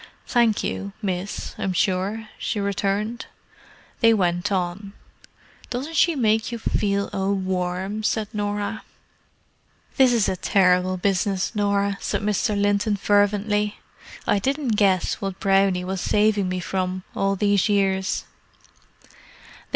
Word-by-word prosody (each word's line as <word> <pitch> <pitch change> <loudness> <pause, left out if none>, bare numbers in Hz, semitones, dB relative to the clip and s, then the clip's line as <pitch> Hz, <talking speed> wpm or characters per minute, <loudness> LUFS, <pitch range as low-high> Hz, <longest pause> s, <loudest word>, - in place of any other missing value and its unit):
"Thank 235 -3 +2
you, 200 0 -4
miss, 190 -2 -4
I'm 190 - -1
sure," 195 +5 0
she 215 - -2
returned. 200 +3 -2 0.7
They 230 -1 +5
went 175 0 0
on. 190 +2 -2 0.8
"Doesn't 275 +7 -4
she 335 +1 +4
make 220 -3 +1
you 235 - -3
feel 200 -2 0
a 195 0 0
worm!" 190 +1 -2
said 215 0 0
Norah. 205 +1 -2 1.2
"This 260 -3 +6
is 230 -4 +2
a - - 0
terrible 185 0 +2
business, 195 +1 0
Norah!" 200 -1 +1
said - - -2
Mr. 210 0 0
Linton 205 +1 +2
fervently. 205 +1 +1 0.5
"I 205 - +2
didn't 275 +4 -1
guess 200 -4 +2
what 195 -2 -4
Brownie 195 -2 +2
was 190 0 -3
saving 210 -2 +2
me 185 0 -2
from, 185 0 -2
all 195 0 +1
these 205 +1 +2
years." 190 -2 +1
200 Hz, 125 wpm, -23 LUFS, 190-210 Hz, 1.2 s, This